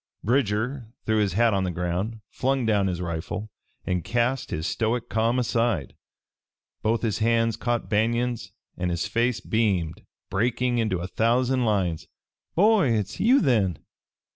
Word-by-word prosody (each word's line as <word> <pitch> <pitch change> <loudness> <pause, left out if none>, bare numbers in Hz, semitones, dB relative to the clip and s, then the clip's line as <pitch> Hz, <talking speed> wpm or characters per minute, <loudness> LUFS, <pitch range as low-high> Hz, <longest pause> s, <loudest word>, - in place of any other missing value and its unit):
Bridger 120 - 0 0.2
threw 110 0 +2
his 100 -4 +1
hat 115 +2 +3
on 95 -1 +1
the 90 - -1
ground, 90 +6 -3
flung 135 -1 0
down 105 -3 +2
his 90 -2 -2
rifle 90 +5 -4 0.3
and 90 -2 -1
cast 120 +2 0
his 80 +1 -3
stoic 115 +4 -1
calm 115 +2 +1
aside. 115 - 0 0.9
Both 115 +2 0
his 110 -2 0
hands 115 0 +2
caught 120 -1 -1
Banion's 120 +2 0 0.2
and 90 +1 -2
his 85 -1 -1
face 120 0 0
beamed, 95 -8 0 0.3
breaking 120 +4 +1
into 95 -6 0
a 90 - -3
thousand 125 +5 +1
lines. 95 -7 0 0.5
"Boy, 195 - +4
hit's 105 -3 -2
you, 255 +5 +5
then! 105 - +2
110 Hz, 145 wpm, -25 LUFS, 95-120 Hz, 0.9 s, you